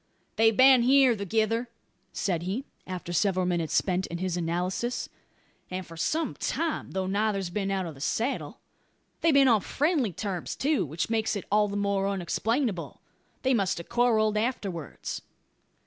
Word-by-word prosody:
"They've 225 -1 +4
been 260 -1 +7
here 260 0 +5
thegither," 220 +4 0 0.4
said 175 -4 -1
he, 195 +10 -3 0.2
after 180 -1 -5
several 185 +1 +2
minutes 170 -3 -1
spent 185 0 +1
in 170 - -5
his 185 0 -2
analysis, 180 +8 -2 0.6
"and 185 0 -4
for 165 - -11
some 310 - -1
time; 330 -2 -2
though 190 0 -1
neither's 195 -1 0
been 195 +1 -2
out 190 -1 -1
of 165 - -6
the 135 - -13
saddle. 235 - -2 0.6
They've 330 - +4
been 280 -2 +6
on 225 -5 +4
friendly 290 - 0
terms, 185 -1 -4
too; 285 - +1
which 160 +9 -3
makes 220 -1 +1
it 200 - -4
all 210 0 +4
the 200 0 -3
more 200 -1 +1
unexplainable. 200 - -1 0.4
They 260 0 +3
must 195 -7 +1
have 170 - -8
quarrelled 220 -3 +2
afterwards." 200 - -3
200 Hz, 160 wpm, -28 LUFS, 180-240 Hz, 0.6 s, been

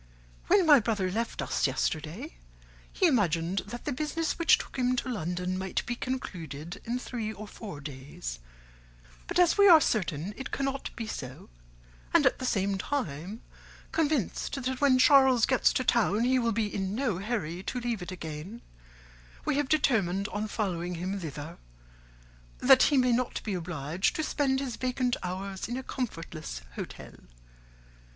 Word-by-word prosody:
"'When 385 -3 +5
my 295 -3 +8
brother 210 -5 0
left 230 +4 -2
us - - +1
yesterday, 175 - -2 0.6
he 380 - +1
imagined 190 - +2
that 240 +4 -7
the - - -1
business 305 +5 -2
which 335 - +6
took - - -8
him 250 0 +2
to 250 - -2
London 180 -3 -2
might 190 -1 -2
be 240 - -2
concluded 175 - -5
in 240 +2 -1
three 235 -3 -4
or 215 0 -8
four 200 -8 -8
days; 130 - -7 0.9
but - - -2
as 355 +2 +4
we 400 -1 +8
are 330 -3 +10
certain 185 - -1
it 265 - -5
cannot 275 0 -2
be 230 - -4
so, 130 - -7 0.6
and - - +6
at - - +3
the 255 - -2
same 195 -2 0
time 195 - -3 0.5
convinced 290 - 0
that 260 +1 -2
when 275 -3 +5
Charles 265 -3 +6
gets 260 -2 +3
to 255 - 0
town 230 -3 +2
he 255 +1 +3
will 235 -1 +1
be 220 0 +1
in 195 0 -2
no 235 -8 0
hurry 195 -5 -3
to 250 +5 -3
leave 235 -4 -2
it 180 - -6
again, 165 +5 -7 0.8
we - - +1
have 290 -2 0
determined 200 - +2
on 215 0 -3
following 180 -5 -2
him 185 +4 -3
thither, 155 0 -7 1.0
that 265 0 +6
he 290 - +3
may 250 -1 +4
not 245 +1 0
be 210 - -2
obliged 170 -1 -1
to 315 - -1
spend 275 -3 +1
his 260 -4 -4
vacant 255 -1 0
hours 190 +1 -4
in 240 +2 -3
a 260 - -5
comfortless 165 - -5
hotel. - - -7
220 Hz, 165 wpm, -29 LUFS, 180-255 Hz, 1.0 s, are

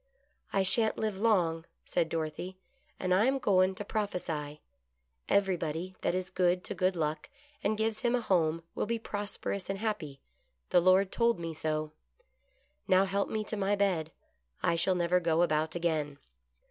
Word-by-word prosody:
" - - -44
I 195 - +2
sha'n't 220 +4 +2
live 215 -3 -2
long," 175 -7 +2 0.2
said 165 -2 0
Dorothy, 165 +3 -4 0.2
" - - -38
and 185 -1 +1
I 195 +4 +4
am 270 +1 +2
goin' 190 -6 +3
to 205 - -6
prophesy: 165 -9 -3 0.7
Everybody 180 -3 0
that - - 0
is 185 0 -3
good 180 0 +2
to - - -4
Good 185 0 +1
Luck 155 -2 -2 0.3
and 210 +1 +1
gives 220 0 0
him 245 -1 +2
a 245 - 0
home 165 -5 +1
will - - -2
be 230 +1 0
prosperous 205 -3 -4
and 195 - -1
happy; 180 -10 -3 0.5
the 180 - +6
Lord 185 +2 +4
told 235 -4 +2
me 165 -1 -4
so. 155 0 -2 1.0
Now 185 +1 +5
help 200 +1 -1
me 215 -1 -1
to 215 - -4
my 200 0 +1
bed 180 -6 0 0.3
— 60 0 -35
I - - +3
shall 175 +3 +2
never 180 +1 +2
go 170 -1 +2
about 155 -1 0
again." 155 -4 -1
185 Hz, 175 wpm, -31 LUFS, 165-200 Hz, 1.0 s, the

